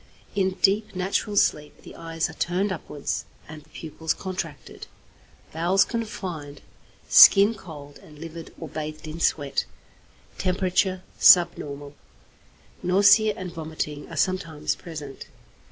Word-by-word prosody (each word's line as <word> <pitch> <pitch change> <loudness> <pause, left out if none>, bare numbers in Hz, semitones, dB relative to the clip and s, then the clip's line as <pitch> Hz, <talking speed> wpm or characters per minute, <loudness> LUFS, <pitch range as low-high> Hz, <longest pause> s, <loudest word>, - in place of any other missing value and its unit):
In 190 -2 0
deep, 205 +1 +2
natural 195 +3 -1
sleep 150 -6 0
the - - -12
eyes 165 -1 -3
are 160 - -11
turned 180 +5 -1
upwards 150 -5 -4 0.2
and 155 0 -10
the - - -25
pupils 160 0 -4
contracted. 170 -8 -7 0.7
Bowels 175 +4 +2
confined, 180 -11 -6 0.5
skin 200 +3 +8
cold 145 -8 -12
and 150 - -16
livid 165 +1 -9
or 165 - -6
bathed 155 +1 -7
in 155 +2 -7
sweat. 145 -4 0 0.7
Temperature 185 0 0 0.2
subnormal. 145 -5 +4 0.9
Nausea 205 +3 +4
and 180 -2 -7
vomiting 155 -2 -5
are - - -8
sometimes 165 -5 -1
present. 150 -5 -9
165 Hz, 120 wpm, -24 LUFS, 150-190 Hz, 0.9 s, skin